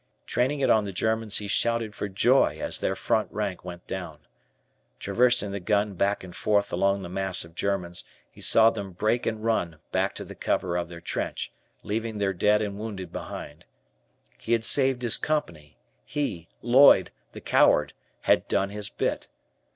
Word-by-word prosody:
Training 135 +4 0
it 135 - +2
on 110 - +4
the 100 - -5
Germans, 110 +2 +1
he 105 - -2
shouted 115 +1 0
for 105 - -4
joy 120 +8 +3
as - - +1
their - - -1
front 110 - 0
rank 100 -4 -3
went 90 -1 -9
down. 90 -5 -6 0.8
Traversing 120 - +2
the 100 - -4
gun 105 +2 0
back 100 +2 0
and 90 -2 -10
forth 100 -1 +1
along 100 0 +1
the - - -6
mass 95 -1 -1
of 85 - -16
Germans, 90 -2 -2 0.3
he - - -15
saw 115 0 +5
them 100 -4 -6
break 110 +6 0
and 110 -1 -3
run 90 -8 0
back - - 0
to - - -6
the - - -9
cover 90 -2 -1
of 85 -1 -2
their 85 -1 -10
trench, 85 - -4 0.3
leaving 110 +1 -3
their 100 -1 0
dead 105 +3 +2
and 100 -1 -5
wounded 100 -5 -6
behind. 75 +4 -8 0.7
He 115 - -1
had 115 -1 +1
saved 130 0 +3
his 115 -1 +4
Company, 85 - -3 0.3
he, 90 - -3 0.2
Lloyd, 130 +4 +6 0.2
the - - -9
coward, - - +3 0.3
had - - +2
"done 100 0 0
his 105 0 -3
bit." - - -2
100 Hz, 175 wpm, -26 LUFS, 90-115 Hz, 0.8 s, Lloyd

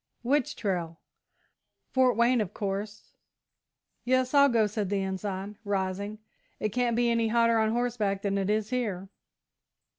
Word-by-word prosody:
"Which 270 +2 +1
trail?" 170 -5 -3 0.9
"Fort 255 -3 +3
Wayne, 235 0 +4
of 205 -1 -4
course." 205 +1 -4 0.9
"Yes, 255 +1 +1
I'll 280 -1 +6
go," 230 -3 +3
said 210 -2 -2
the 200 -1 0
Ensign, 190 +1 -4
rising; 200 +1 -2 0.4
"it 215 - 0
can't 240 +1 0
be 240 0 +2
any 230 -1 +2
hotter 230 0 +3
on 220 0 +2
horseback 225 -4 -1
than 200 -1 0
it 195 0 -1
is 215 +1 0
here." 205 -7 -2
215 Hz, 145 wpm, -28 LUFS, 195-240 Hz, 0.9 s, I'll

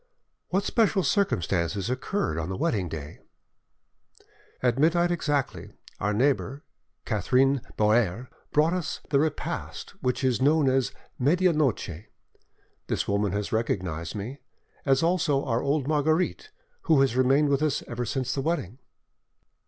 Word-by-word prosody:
"What 195 +2 +1
special 210 -3 +2
circumstances 95 - 0
occurred 130 - -1
on 80 +2 -3
the 95 - -3
wedding 110 - 0
day?" 75 -2 -7 1.4
"At 125 0 +2
midnight 170 +3 +3
exactly, 145 -5 -2 0.3
our 105 - 0
neighbour, 135 +4 0 0.4
Catherine 130 +5 +2 0.2
Boere, 110 +1 +2 0.2
brought 155 +3 +3
us 180 -3 -3
the 140 - +4
repast 155 0 -3
which 125 +1 -1
is 130 -1 +1
known 145 +1 +4
as 130 -1 +2 0.3
'medianoche.' 145 - +1 0.8
This - - -1
woman 100 -1 0
has 105 0 -2
recognised 90 -7 -2
me, 115 +8 -6 0.5
as 135 +2 +3
also 165 -5 +1
our 120 -2 0
old 140 -1 0
Marguerite, 155 - +1 0.4
who 155 -4 +6
has 135 -3 +2
remained 135 +3 +3
with 140 0 +2
us 155 -3 0
ever 120 0 -3
since 130 +2 -2
the 140 - -1
wedding." 135 - -2
135 Hz, 130 wpm, -26 LUFS, 110-155 Hz, 1.4 s, who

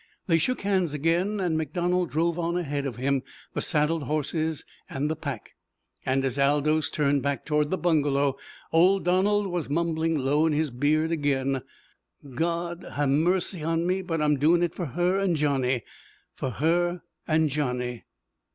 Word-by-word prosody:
They 165 -4 +3
shook 255 +10 0
hands 185 -6 0
again, 170 +7 +1
and 175 -4 0
MacDonald 175 +3 0
drove 170 +2 0
on 170 +1 0
ahead 145 -5 -2
of 125 - -5
him 135 +2 0 0.3
the - - -2
saddled 155 -1 +1
horses 155 +1 -2 0.2
and 145 +3 -2
the - - -1
pack. 140 -7 -6 0.6
And 135 +1 +1
as 135 +1 -1
Aldous 145 +2 +2
turned 140 -2 +1
back 140 -2 -2
toward 150 -1 +1
the 190 - 0
bungalow 145 -5 +2 0.4
old 185 +4 +4
Donald 200 +3 +2
was 175 -6 -3
mumbling 165 +1 0
low 145 +4 +2
in 155 - +1
his 150 -1 0
beard 150 +6 +1
again, 135 -4 0 0.7
"God 170 +4 -2
ha' 145 - 0
mercy 175 +5 +1
on 165 +2 0
me, 185 +2 0
but 165 -4 -2
I'm 150 -1 +3
doin' 170 +4 +4
it 170 -1 0
for 175 - -4
her 175 +7 +1
an' 190 -4 +1
Johnny 130 -5 +1 0.5
for 130 - -3
her 175 - 0 0.2
an' 160 0 +3
Johnny!" 125 -4 -2
155 Hz, 165 wpm, -26 LUFS, 140-175 Hz, 0.7 s, old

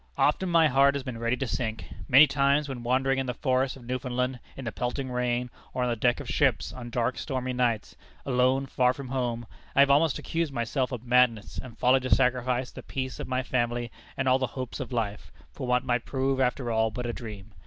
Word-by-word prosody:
Often 175 +5 +2
my 165 -2 +5
heart 140 0 +4
has 140 - -3
been 125 -3 -6
ready 115 +2 0
to 135 - -2
sink. 115 -2 -3 0.2
Many 140 +3 +8
times, 140 +1 +2
when 130 -3 -5
wandering 135 +2 +1
in 135 - -2
the 125 - -2
forests 130 0 0
of 125 - -14
Newfoundland, 125 0 -2 0.2
in 135 - -7
the 115 - -2
pelting 125 +3 -3
rain, 125 0 -1 0.2
or 125 - 0
on 125 - +1
the - - 0
deck 120 +2 +1
of - - -7
ships, - - +1
on 120 -2 -7
dark, 120 +1 -1
stormy 130 -3 -3
nights 120 -4 0 0.3
alone, 130 +1 +2
far 125 -1 +2
from 135 -2 -8
home 120 -3 -2 0.3
I 140 - +7
have 140 0 +5
almost 150 +1 +4
accused 165 -2 -2
myself 125 +2 -1
of 125 -2 -5
madness 120 -3 +2
and 125 -3 -11
folly 130 +1 +4
to 130 0 -4
sacrifice 125 0 +2
the - - -9
peace 130 -1 -5
of - - -5
my 130 0 -1
family, 120 -1 -1 0.3
and 130 - -1
all 130 +1 +4
the 130 - 0
hopes 130 -1 -4
of - - -5
life, 110 -4 -3 0.2
for 125 - -6
what 125 0 +2
might 120 -1 0
prove 135 0 -1
after 125 -1 0
all 110 0 +2
but 125 +3 -5
a 120 - -2
dream. 110 -3 -8
125 Hz, 225 wpm, -27 LUFS, 120-135 Hz, 0.3 s, Many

